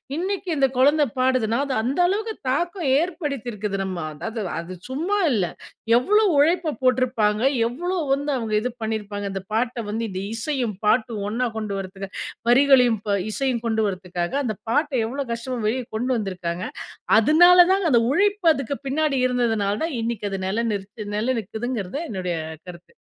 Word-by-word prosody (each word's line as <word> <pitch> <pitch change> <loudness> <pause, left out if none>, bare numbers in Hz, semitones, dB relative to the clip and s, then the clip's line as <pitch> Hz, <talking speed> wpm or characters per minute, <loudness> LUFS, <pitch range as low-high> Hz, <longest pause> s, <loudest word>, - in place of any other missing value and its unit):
இன்னைக்கு 370 +2 -2
இந்த 270 -1 +4
கொழந்தை 290 +3 +5
பாடுதுன்னா, 255 -3 +2
அது 275 - -2
அந்த 265 +9 -1
அளவுக்கு 435 +3 -1 0.2
தாக்கம் 345 +3 -1
ஏற்படுத்தியிருக்குது 250 - -3
நம்ம 185 -2 -4 0.2
அதாவது, 225 +9 -5 0.2
அது 175 +2 -7
சும்மா 335 +10 -1
இல்ல. 195 -7 +1 0.5
எவ்வளோ 420 - +3
உழைப்ப 325 +1 +3
போட்டிருப்பாங்க, 240 -4 +2 0.3
எவ்வளோ 350 +9 -3 0.2
வந்து 285 +1 -1
அவுங்க 225 -3 -3
இது 250 - -1
பண்ணியிருப்பாங்க, 210 -2 -3
இந்த 195 - -3
பாட்டை 235 0 -1
வந்து 225 +2 -2
இந்த 185 0 -4
இசையும், 240 -3 -2
பாட்டும் 220 -1 +1
ஒண்ணா 245 +3 0
கொண்டு 210 -2 -3
வர்றதுக்கு. 190 +1 -7 0.4
வரிகளையும் 250 -4 +5
ப 200 0 +2
இசையும் 255 -1 -1
கொண்டுவர்றதுக்காக. 185 -4 -1
அந்த 215 -3 -2
பாட்டை 290 +2 +1
எவ்வளோ 275 +3 -3
கஷ்டமா 240 +1 -4
வெளிய 250 +3 0
கொண்டு 250 +3 -1
வந்திருக்காங்க. 180 -4 -3 0.6
அதுனால 350 +8 +7
தாங்க, 390 -2 +1
அந்த 235 - +5
உழைப்பு 400 +1 +1
அதுக்கு 275 +1 -3
பின்னாடி 285 -1 +1
இருந்ததனால 225 -5 0
தான், 320 -6 -2
இன்னைக்கு 225 -3 -2
அது 195 - -3
நில 225 +4 0
நிறுத் 205 +1 -6
நில 230 +5 +1
நிக்குதுங்கிறது 220 +5 -4 0.4
என்னுடைய 180 -4 -2 0.3
கருத்து. 175 -1 -12
240 Hz, 150 wpm, -23 LUFS, 210-285 Hz, 0.6 s, அதுனால